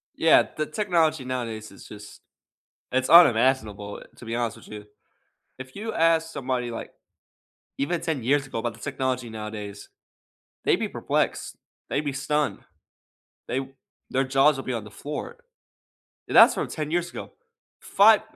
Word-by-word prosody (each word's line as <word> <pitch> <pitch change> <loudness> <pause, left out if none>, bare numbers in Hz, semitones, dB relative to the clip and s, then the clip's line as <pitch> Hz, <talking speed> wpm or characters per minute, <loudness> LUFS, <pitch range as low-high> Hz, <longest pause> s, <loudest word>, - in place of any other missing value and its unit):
Yeah, - - +5
the 155 - -1
technology, 160 -6 0
nowadays, 115 -4 -4
is 100 - -14
just 105 0 -12 0.7
it's 130 0 0
unimaginable, 115 - +4
to - - -12
be 115 0 -3
honest 120 -2 -2
with - - -15
you. 105 -1 -9 0.8
If 130 0 -10
you 220 +2 -5
ask 165 0 +2
somebody, 125 -4 -3
like 115 - -7 0.9
even 165 +5 -1
10 155 -7 -2
years 140 +3 +2
ago, 135 - -5
about 120 0 -3
the 115 - -16
technology, 130 -2 -2
nowadays, 105 -2 -7 0.8
they'd - - +4
be - - -2
perplexed. - - -2 0.3
They'd - - 0
be 145 - -2
stunned. 145 +2 -1 0.9
They 130 +2 -3 0.4
their 135 +1 +1
jaws 135 +2 +4
will 135 - -6
be 130 - -3
on 115 -3 -3
the 105 - -11
floor. 150 - -6 0.9
And, - - -4
that's - - +9
from - - -2
10 155 -1 -5
years 175 +1 0
ago. - - -8 0.5
Fi 210 +2 +5
130 Hz, 155 wpm, -25 LUFS, 115-155 Hz, 0.9 s, that's